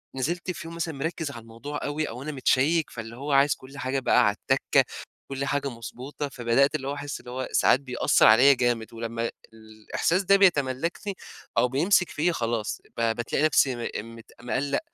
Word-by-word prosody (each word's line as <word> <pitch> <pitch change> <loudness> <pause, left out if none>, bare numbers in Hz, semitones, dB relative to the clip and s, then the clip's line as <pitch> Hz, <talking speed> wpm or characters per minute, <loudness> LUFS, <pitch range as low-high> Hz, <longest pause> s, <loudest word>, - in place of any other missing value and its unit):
نزلت 170 +7 -2
في 165 - -8
يوم 165 - -8
مثلًا 165 -1 -3
مركّز 155 +1 -3
على 120 - -9
الموضوع 115 +6 -7
أوي 150 +1 -2
أو 125 +4 -7
أنا 155 - -4
متشيّك 145 +4 +2
فاللي 115 0 -8
هو 140 +3 -5
عايز 140 +1 +4
كُلّ 135 +2 -14
حاجة 135 0 -1
بقى 125 -1 +4
عالتكّة، 100 - +2 0.5
كُلّ 135 0 -2
حاجة 140 0 -1
مضبوطة، 130 +4 -7
فبدأت 135 +4 +2
اللي 135 -3 -3
هو 140 - -2
أحسّ 145 0 -5
اللي 125 - -11
هو 130 +1 -3
ساعات 130 - +4
بيأثّر 125 -5 +3
عليّا 125 +6 +7
جامد. 120 -3 -1
ولمّا 115 0 -3 0.2
الإحساس 110 - -2
ده 195 +2 +5
بيتملّكني 170 +1 +1 0.4
أو 125 - +4
بيمسك 175 +8 +2
فيّا، 175 +4 0
خلاص، 115 -3 -2 0.2
ب 115 - -1
بتلاقي 130 +5 0
نفسي 135 -4 +3
م 115 -1 -5
مت 115 - -14
مقلق، 135 +3 -1
135 Hz, 180 wpm, -26 LUFS, 120-150 Hz, 0.5 s, عليّا